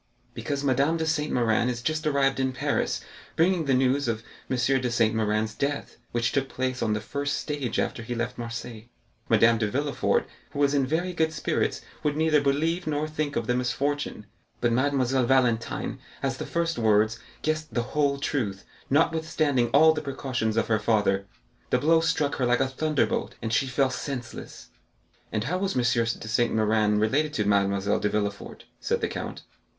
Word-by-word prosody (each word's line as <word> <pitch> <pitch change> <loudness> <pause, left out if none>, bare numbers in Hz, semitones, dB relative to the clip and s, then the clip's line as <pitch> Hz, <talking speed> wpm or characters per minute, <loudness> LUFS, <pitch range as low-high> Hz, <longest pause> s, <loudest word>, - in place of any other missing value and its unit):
"Because 140 +1 -3
Madame 140 +4 +2
de 160 - -1
Saint 155 -1 0
Méran 115 0 +2
is 120 -1 -4
just 155 +2 -1
arrived 135 -2 +2
in 130 -1 0
Paris, - - -1 0.3
bringing 170 0 +2
the 135 -2 +3
news 130 +1 +2
of 115 -1 -2 0.3
M. 130 - 0
de 125 0 +1
Saint 115 -2 +2
Méran's 110 0 0
death, 140 +5 -3
which 120 0 0
took 135 -1 0
place 130 0 -2
on 110 - +1
the 105 - -1
first 140 +6 -2
stage 145 -5 -3
after - - -1
he 120 +1 -4
left 120 +1 -2
Marseilles. 115 -1 -6 0.4
Madame 115 +1 +5
de 105 - +1
Villefort, 140 +5 0 0.3
who - - -7
was 140 0 +3
in 135 -2 +2
very 175 +5 -1
good 160 -2 +1
spirits, 155 - -1 0.2
would 150 -1 0
neither 155 -2 +3
believe 160 +5 0
nor 150 0 0
think 155 -2 -3
of 115 - -1
the 125 - +1
misfortune, 125 -1 -1 0.3
but 120 0 +1
Mademoiselle 130 0 +2
Valentine, 120 -3 +1 0.2
at 135 -1 +1
the - - -4
first 170 -4 -1
words, 110 0 +3 0.2
guessed 155 0 -1
the 120 - 0
whole 145 -2 +2
truth, 115 -10 -2 0.2
notwithstanding 155 -3 +2
all 160 +2 +6
the 155 - -3
precautions 130 -6 -2
of - - +3
her 110 -1 +2
father; 105 -3 +1 0.4
the - - +3
blow 160 +2 +4
struck 160 -3 0
her 130 - +1
like 125 0 +3
a 135 - +2
thunderbolt, 150 +2 -1
and 110 0 -3
she 135 - +2
fell 130 +1 +1
senseless." 130 -2 -6 0.6
"And 110 -1 -1
how 180 +9 -1
was 195 -6 -1
M. 125 - +2
de 115 -2 0
Saint 120 +1 +1
Méran 110 -1 +2
related 145 +8 +1
to 105 - 0
Mademoiselle 100 0 +2
de 105 - 0
Villefort?" 100 -1 -3
said - - 0
the - - +1
count. - - -6
130 Hz, 185 wpm, -26 LUFS, 115-145 Hz, 0.6 s, all